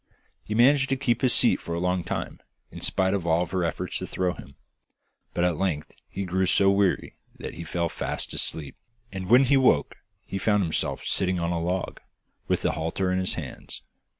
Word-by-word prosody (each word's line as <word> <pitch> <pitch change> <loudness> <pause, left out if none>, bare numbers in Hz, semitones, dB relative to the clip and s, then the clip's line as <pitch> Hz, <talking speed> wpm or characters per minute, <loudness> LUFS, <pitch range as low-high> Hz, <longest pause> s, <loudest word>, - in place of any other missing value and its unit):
He 105 - -4
managed 135 +4 +5
to 135 - +2
keep 125 -3 0
his 130 -2 +3
seat - - +3
for 85 - -4
a - - -2
long 90 0 0
time, - - -4 0.3
in - - -9
spite 95 0 +2
of 95 -4 -1
all 85 +2 +3
her 90 +1 -2
efforts 85 - -2
to - - -5
throw 90 -1 -1
him, 70 -5 -12 0.8
but 85 - +1
at 90 -3 +2
length 85 -5 -2
he 100 +1 -4
grew 95 +1 +1
so 95 +2 +5
weary 100 -2 +1 0.2
that - - -6
he 85 - -7
fell 85 +1 -1
fast - - -4
asleep, 75 -4 -2 0.4
and 95 -2 -5
when 125 +4 +7
he 135 +1 +4
woke 105 - +3 0.3
he 95 - -4
found 105 0 +2
himself 80 -3 -1
sitting 95 -2 +1
on 85 0 -1
a 85 -1 -1
log, 90 +2 -2 0.5
with - - +1
the - - +2
halter 85 +4 -1
in 95 - +1
his 95 - -1
hands. - - -7
95 Hz, 205 wpm, -26 LUFS, 85-100 Hz, 0.8 s, when